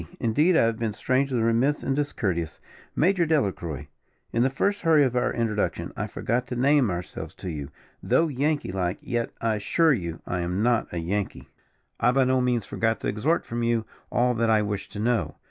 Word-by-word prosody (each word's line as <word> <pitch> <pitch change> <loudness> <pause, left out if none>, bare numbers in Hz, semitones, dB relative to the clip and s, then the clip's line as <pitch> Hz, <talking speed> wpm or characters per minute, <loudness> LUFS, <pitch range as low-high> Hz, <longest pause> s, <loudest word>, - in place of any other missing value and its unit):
Indeed 150 +10 +3
I - - +5
have 115 -1 0
been 115 -2 -1
strangely 130 +2 0
remiss 115 +6 +2
and 135 - 0
discourteous, 95 - -2 0.4
Major 185 +2 +3
Delacroix. 95 - -1 0.5
In 115 - +2
the 130 - +4
first 200 +10 0
hurry 160 -3 +5
of 125 -2 0
our 125 - +1
introduction, 110 -3 -1
I - - -3
forgot 120 +2 -2
to 125 - -4
name 135 -1 +3
ourselves 90 -1 -5
to 90 - -6
you, 75 -3 -5 0.3
though 165 - +3
Yankee 145 - -1
like; 90 -1 -1
yet, 120 -1 -2
I 110 -1 +1
assure 160 +9 +3
you, 85 -8 -4
I 90 - -2
am 90 +4 -1
not 120 -1 +1
a 90 - -4
Yankee; 95 +4 -3 0.5
I 120 - +4
by 135 0 +4
no 130 0 +2
means 120 -4 +1
forgot 110 +2 0
to - - -2
exhort 150 +11 0
from 120 +1 -3
you 115 -1 +1 0.3
all 125 +1 +2
that 115 -1 +1
I 110 -1 +4
wished 100 -1 -4
to 105 - -5
know. 120 +2 0
115 Hz, 195 wpm, -26 LUFS, 105-135 Hz, 0.5 s, I